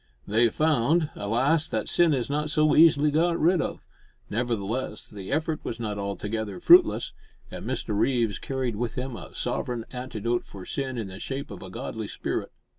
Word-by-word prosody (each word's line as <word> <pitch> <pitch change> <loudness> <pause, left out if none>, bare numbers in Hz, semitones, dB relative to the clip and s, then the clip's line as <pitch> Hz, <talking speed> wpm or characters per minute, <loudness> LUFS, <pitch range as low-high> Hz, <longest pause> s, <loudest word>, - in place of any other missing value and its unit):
They 115 +3 +3
found, 155 +3 +2
alas! 135 +10 +1
that 110 -6 -2
sin 170 -2 +4
is 130 -5 0
not 150 +2 -1
so 155 0 +3
easily 150 -2 +6
got 170 +3 +2
rid 170 +2 +4
of; - - -4 0.5
nevertheless, 115 0 -2
the 100 0 -8
effort 155 +1 -1
was 115 - -5
not 105 -3 -3
altogether 105 - -3
fruitless, 350 - +6 0.4
and - - -7
Mr 105 - -2
Reeves 115 -2 +1
carried 130 -5 -2
with 120 0 -2
him 125 -1 -4
a - - -10
sovereign 120 -2 -2
antidote 120 -2 -3
for 95 -2 -10
sin 130 -2 -3
in 110 -4 -4
the 95 +1 -9
shape 135 +3 -5
of 100 - -8
a - - -8
godly - - -5
spirit. - - -3
125 Hz, 175 wpm, -26 LUFS, 110-150 Hz, 0.5 s, easily